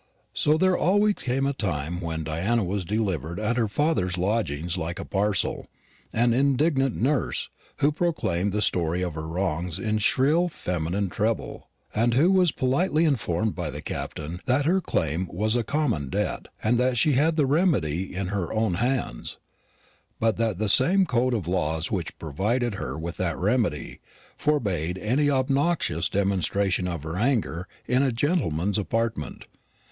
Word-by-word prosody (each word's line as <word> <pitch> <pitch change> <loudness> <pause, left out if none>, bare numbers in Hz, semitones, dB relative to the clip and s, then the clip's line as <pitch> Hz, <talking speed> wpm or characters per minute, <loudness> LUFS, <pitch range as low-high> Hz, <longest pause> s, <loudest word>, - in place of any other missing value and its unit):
So 150 +1 +2
there 185 +2 +3
always 205 +6 +3
came 135 -5 -1
a 140 - +1
time 85 - -2
when 80 -2 -3
Diana 90 +10 0
was 95 +1 -2
delivered 90 - -2
at 110 +2 0
her 115 -2 +1
father's 100 - 0
lodgings 90 -4 -1
like 85 0 -3
a - - -5
parcel, 100 -1 0 0.4
by 115 - -1
an 120 -1 +4
indignant 135 0 +2
nurse, 135 +1 0 0.3
who 145 - +4
proclaimed 105 - 0
the 105 +2 +1
story 85 +1 0
of 90 -3 -2
her 80 0 -5
wrongs 85 -1 -2
in 110 -2 -1
shrill 145 +10 +3
feminine 90 - -2
treble, 110 +5 -2 0.2
and 115 +2 +2
who 165 +8 +4
was 185 -4 +4
politely 155 +6 +1
informed 110 - 0
by - - -4
the - - -7
Captain 80 +3 -5
that 130 +2 +2
her 185 +4 +3
claim 80 - -1
was 110 +5 0
a 120 - +2
common 125 - -1
debt, - - -2 0.2
and 120 +2 +2
that 125 0 +2
she 150 - +4
had 150 +5 +3
the 150 -3 +3
remedy 115 - +1
in 95 -1 -2
her 95 -4 -2
own 110 -3 +1
hands, 125 +8 -2 0.8
but 115 -1 +2
that 110 -5 0
the 110 +2 -1
same 180 - +5
code 125 -3 +1
of 95 -7 -3
laws 80 -2 -1
which 90 -6 -3
provided 105 - -1
her 70 -8 -5
with 85 +1 -5
that - - -1
remedy, - - 0 0.4
forbade 95 - 0
any 130 +9 +1
obnoxious 135 - +1
demonstration 95 -1 0
of 85 -4 -4
her 80 +3 -4
anger 105 - 0 0.2
in 125 +1 +2
a 135 -2 +2
gentleman's 105 - 0
apartment. 115 -6 -2
110 Hz, 160 wpm, -25 LUFS, 90-135 Hz, 0.8 s, same